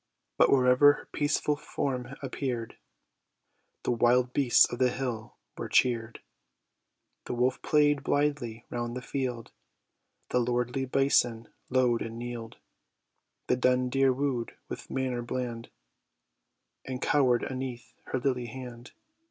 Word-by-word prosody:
But - - +5
wherever 130 +2 +6
her - - -11
peaceful 145 0 +1
form 135 -3 -4
appear'd, 125 -4 -3 1.1
The - - 0
wild 120 +1 +3
beasts 135 -4 +5
of 120 - -4
the 130 -1 +4
hill 120 -3 -4 0.2
were - - -5
cheer'd; 115 -2 +1 1.0
The - - -3
wolf 125 +2 +1
play'd 145 -1 +3
blythly 140 -7 -1
round 120 0 -3
the 125 - -6
field, 125 -4 -3 0.8
The 125 - +2
lordly 125 +2 0
bison 125 -4 +2 0.2
low'd 125 -2 +2
and 115 0 -5
kneel'd; 120 -1 -6 0.9
The - - +2
dun 125 0 +2
deer 135 +1 +3
woo'd 130 -3 -2
with - - -7
manner 130 -2 -1
bland, 120 -1 -4 1.1
And 130 -1 -5
cower'd 130 -4 +3
aneath 125 -3 -5
her 130 - -2
lily 125 -2 -1
hand. 125 0 -9
125 Hz, 125 wpm, -29 LUFS, 120-135 Hz, 1.1 s, wherever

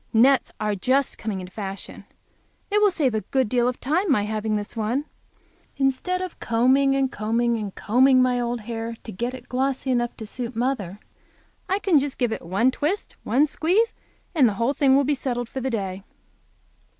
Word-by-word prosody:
Nets 255 +4 +4
are 210 -1 0
just 260 +7 0
coming 205 -4 -3
into 180 0 -10
fashion. 195 -2 -7 0.7
It 420 +1 +3
will 415 - +6
save 295 - 0
a 215 - 0
good 260 0 0
deal 245 +2 +2
of 250 - -2
time 335 +6 +1
my 210 -7 +3
having 215 0 -1
this 205 +2 -4
one. 230 +6 -1 0.7
Instead 280 +7 0
of 370 - -7
combing 260 +4 +3
and 270 -1 +1
combing 235 +2 0
and 205 -3 -5
combing 255 +4 +4
my 250 -1 +3
old 240 -1 -2
hair 230 +1 -5
to 225 - -7
get 240 +6 -3
it 255 - -12
glossy 265 +1 -1
enough 240 -1 0
to 220 - -6
suit 240 +2 -5
mother, 220 -6 -2 0.7
I 380 - +2
can 380 -7 +3
just 280 0 -3
give 245 -3 0
it - - -5
one 195 +9 +1
twist 315 +10 -2
and - - -7
one 270 +6 +5
squeeze 365 +9 +1 0.4
and 275 -9 +5
the 205 - -4
whole 235 +6 +1
thing 275 -2 +4
will 280 - +4
be 290 +2 +1
settled 245 -3 -2
for 265 - -5
the 265 - -1
day. 195 -5 -3
250 Hz, 200 wpm, -24 LUFS, 220-275 Hz, 0.7 s, will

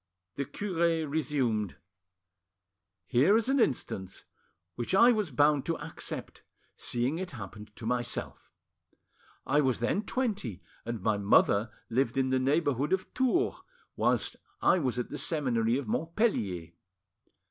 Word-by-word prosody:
The 140 - -2
cure 170 -5 0
resumed— 135 - 0 1.3
"Here 145 - +4
is 230 +2 0
an 275 0 +3
instance 100 - -1 0.5
which 120 - -2
I 235 +5 +7
was 215 -6 0
bound 145 +1 +3
to 165 - 0
accept, 155 +3 -6 0.3
seeing 125 +7 -1
it 185 -3 -5
happened 105 -2 -9
to 110 - -9
myself. 120 0 -3 0.9
I 145 +2 +3
was 130 -4 +1
then 120 - +1
twenty, 200 - -2 0.2
and 115 -5 -4
my 105 -1 +1
mother 100 +1 +4 0.2
lived 125 +1 0
in 130 -1 +2
the 130 - +3
neighbourhood 145 +1 +1
of 190 0 -2
Tours, 260 - +1 0.3
whilst - - +1 0.2
I 185 - +4
was 130 -6 -1
at 125 - -3
the - - -4
seminary 125 -7 +1
of 140 -4 -4
Montpellier. 110 - -1
135 Hz, 135 wpm, -30 LUFS, 115-170 Hz, 1.3 s, I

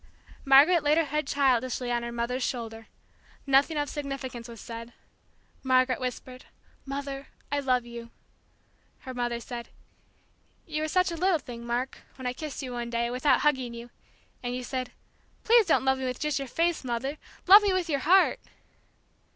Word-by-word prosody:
Margaret 290 +6 +7
laid 295 +1 +3
her 330 - +4
head 300 0 -2
childishly 255 -3 +1
on 240 0 0
her 235 0 -5
mother's 235 +2 -2
shoulder. 225 -3 -4 0.6
Nothing 280 +3 +3
of 290 0 0
significance 275 -5 -5
was 230 -2 -10
said. 230 0 -8 0.7
Margaret 255 -1 +2
whispered, 255 0 -6 0.4
"Mother, 275 0 -5 0.2
I 285 - +1
love 255 -3 +1
you!" 235 -1 -9 0.9
Her 260 - -7
mother 240 -1 -2
said, 235 0 -7 1.0
"You 305 -1 -3
were 310 - -1
such 365 +2 +2
a - - -3
little 365 +1 +2
thing, 235 -4 -9
Mark, 245 +2 -2 0.2
when 260 - -9
I 250 - -1
kissed 295 0 -6
you 255 - -5
one 240 -1 -4
day, 235 0 -1
without 255 +1 +2
hugging 260 -5 +1
you, 235 +1 -10 0.5
and 245 0 -3
you 250 - -4
said, 255 0 -3 0.5
'Please 460 -3 +5
don't 310 - +3
love 265 0 +2
me 260 -1 -1
just 250 - -7
with 300 -2 0
your 275 - -4
face, 335 +5 0
Mother, 260 +4 -3 0.3
love 400 +3 +10
me 410 -1 +2
with 370 -2 0
your 285 -4 0
heart!'" 360 +8 +4
260 Hz, 175 wpm, -28 LUFS, 240-295 Hz, 1.0 s, love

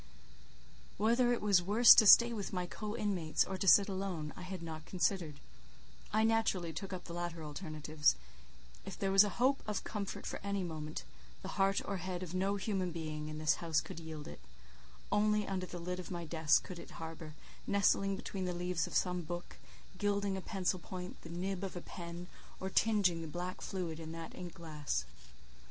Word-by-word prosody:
Whether 235 +4 +3
it 240 - 0
was 200 -4 +5
worse 210 +6 +8
to 215 - +6
stay 235 +3 +9
with 205 -3 -4
my 180 -1 -1
co 210 +4 -5
inmates, 180 -7 +1
or 190 - -4
to 190 +1 -2
sit 200 +2 +8
alone, 185 -6 -3
I - - -9
had 185 -1 -6
not 160 -1 -7
considered; 175 -5 0 0.7
I 215 +1 +3
naturally 220 -7 +1
took 190 +5 -5
up 180 -2 -5
the 170 - -8
latter 170 -1 -4
alternative; 155 - 0 0.7
if 195 - -7
there 195 -1 0
was 195 +1 +8
a 205 - 0
hope 260 +3 +3
of 210 -2 -2
comfort 205 -2 -4
for - - -4
any 200 -1 -1
moment, 155 -2 -5 0.4
the 190 - -5
heart 195 0 +2
or 200 - -2
head 185 0 -4
of 175 -1 -7
no 195 +2 +1
human 190 -2 -1
being 155 -2 -4
in 155 - -6
this 155 0 +2
house 165 -2 +2
could - - -7
yield 160 -2 -7
it; - - -9 0.7
only 210 0 +3
under 185 -2 -2
the 180 - -7
lid 180 +1 -4
of 180 - -7
my 175 -2 -4
desk 160 -1 +3
could 180 -2 -8
it - - -10
harbour, 160 -1 -7 0.3
nestling 195 0 +3
between 190 -1 -4
the 180 -1 -2
leaves 175 -2 -1
of - - -7
some 180 -1 +1
book, 175 +2 -6 0.4
gilding 200 -1 +1
a 190 - -4
pencil 185 -1 -1
point, 180 +1 -7
the 165 - -10
nib 185 +3 -3
of 190 - -4
a - - -3
pen, 170 -1 -7 0.3
or 190 0 -4
tinging 200 -7 +3
the 165 - -5
black 175 +3 -5
fluid 170 -4 -4
in 160 0 -7
that 165 -1 -7
ink 175 -2 -8
glass. 150 - -3
180 Hz, 195 wpm, -34 LUFS, 165-195 Hz, 0.7 s, stay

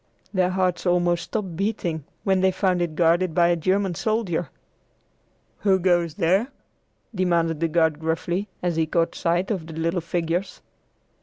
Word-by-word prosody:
Their 185 -2 +2
hearts 185 -1 0
almost 175 -1 +2
stopped 195 -6 -4
beating 175 -6 -2 0.2
when 190 -1 +2
they 190 - +4
found 185 -1 +1
it 170 -3 -2
guarded 170 +1 +2
by 170 -1 +4
a 175 - +3
German 185 +3 0
soldier. 180 -5 -1 1.1
"Who 195 -2 +3
goes 175 -3 +1
there?" 190 +5 +2 0.7
demanded 170 -4 +1
the 165 - +1
guard 160 -2 +2
gruffly, 170 +4 -2 0.2
as 175 -2 0
he 160 -1 +1
caught 165 +1 +1
sight 175 +4 0
of 180 -6 -3
the 165 - -8
little 165 +2 -1
figures. 170 +2 -2
175 Hz, 155 wpm, -24 LUFS, 165-185 Hz, 1.1 s, they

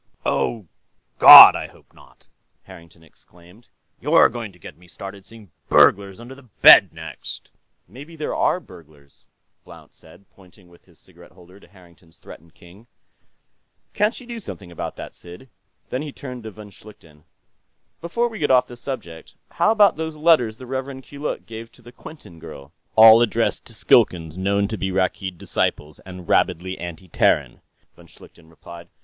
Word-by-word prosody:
"Oh, 110 -5 -2 0.5
God, - - +11
I - - -6
hope - - -24
not!" - - -23 0.4
Harrington 85 0 -17
exclaimed. 90 +7 -23 0.3
"You're - - +3
going 115 -4 -8
to 90 - -22
get 80 - -13
me 90 +3 -22
started 95 +2 -9
seeing 110 -4 -17 0.2
burglars 100 0 +2
under 120 +3 -12
the 135 - -16 0.2
bed, - - +8
next...." 80 0 -11 0.4
"Maybe 140 - -14
there 155 -1 -5
are - - -1
burglars," 75 - -20 0.4
Blount - - -17
said, 80 +5 -21
pointing 95 -1 -22
with 85 - -23
his - - -25
cigarette - - -21
holder 90 +1 -19
to - - -21
Harrington's 85 -2 -23
threatened 85 +1 -17
king. 95 +7 -19 1.1
"Can't 210 +3 -1
you 250 - -15
do 235 -1 -9
something 100 - -11
about 85 - -7
that, - - -11
Sid?" 90 +9 -15 0.4
Then 130 - -4
he 150 -1 -8
turned 125 -4 -11
to - - -7
von 105 -1 -14
Schlichten. 80 -8 -19 0.8
"Before 235 +9 -2
we 220 -3 -10
get 145 - -2
off 125 -1 +3
the 120 -1 -13
subject, 110 -12 -9 0.2
how - - 0
about 210 -5 +3
those 160 -1 -6
letters 150 -9 +1
the 130 - -12
Rev. 130 +1 -7
Keeluk 145 +3 -7
gave 115 0 -11
to - - -22
the 120 - -15
Quinton 125 - -15
girl?" 70 -2 -13 0.2
"All 110 +1 +7
addressed 120 - -2
to - - -12
Skilkans 80 -3 +1
known 100 +2 -1
to 110 0 -7
be 95 - -3
Rakkeed 95 -1 -3
disciples 75 -2 -4
and 90 -2 -13
rabidly 95 +2 -1
anti 85 +1 -9
Terran," - - -1 0.3
von - - -19
Schlichten 80 -1 -20
replied. 85 +1 -14
100 Hz, 165 wpm, -20 LUFS, 85-130 Hz, 1.1 s, God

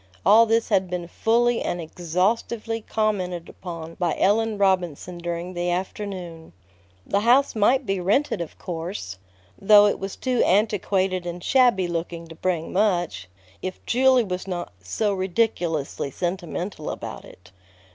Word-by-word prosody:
All 230 +2 +7
this 225 +1 +1
had 190 -1 +2
been 175 -1 -4
fully 235 +5 +2
and 175 - -2
exhaustively 195 +7 -1
commented 190 -6 -1
upon 165 -3 -8
by 175 -3 0
Ellen 220 +2 +2
Robinson 180 -3 0
during 170 +1 -4
the 175 0 -2
afternoon. 180 -2 -5 0.5
The 200 - +1
house 245 +6 +4
might 250 +6 +3
be 195 -2 -1
rented, 205 +5 +1
of 165 - -7
course 165 - -5 0.4
though 205 +1 +7
it 205 - +1
was 195 0 -5
too 255 -2 0
antiquated 190 -2 +1
and 175 0 -6
shabby 245 -9 +3
looking 170 0 -4
to - - -9
bring 165 -1 -2
much 175 - 0 0.3
if 185 0 -5
Julia 255 -1 +4
was 185 0 -4
not 175 - -4
"so 200 - -1
ridiculously 180 -8 -1
sentimental 175 +1 -4
about - - -6
it." 90 0 -16
185 Hz, 140 wpm, -24 LUFS, 175-215 Hz, 0.5 s, All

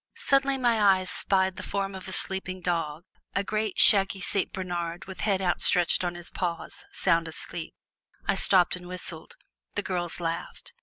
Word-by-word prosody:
Suddenly 275 0 +2
my 240 -4 +2
eye 195 -2 +4
spied 190 0 0
the - - -5
form 195 -1 -3
of 190 0 -8
a - - -5
sleeping 190 -1 +1
dog, 165 -3 -2 0.3
a 200 - +1
great 215 0 -2
shaggy 195 -2 +6
Saint 195 +1 -1
Bernard 175 -3 -4
with 190 0 -10
head 195 -3 0
outstretched 175 0 +2
on 175 -1 -2
his 175 -1 -8
paws, 170 -3 -4
sound 165 -2 +1
asleep. 160 +1 -6 0.5
I - - +3
stopped 185 -3 +4
and 180 -1 -10
whistled. 180 -3 -7 0.4
The - - -1
girls 175 -2 -3
laughed. 170 0 -5
185 Hz, 165 wpm, -27 LUFS, 175-195 Hz, 0.5 s, shaggy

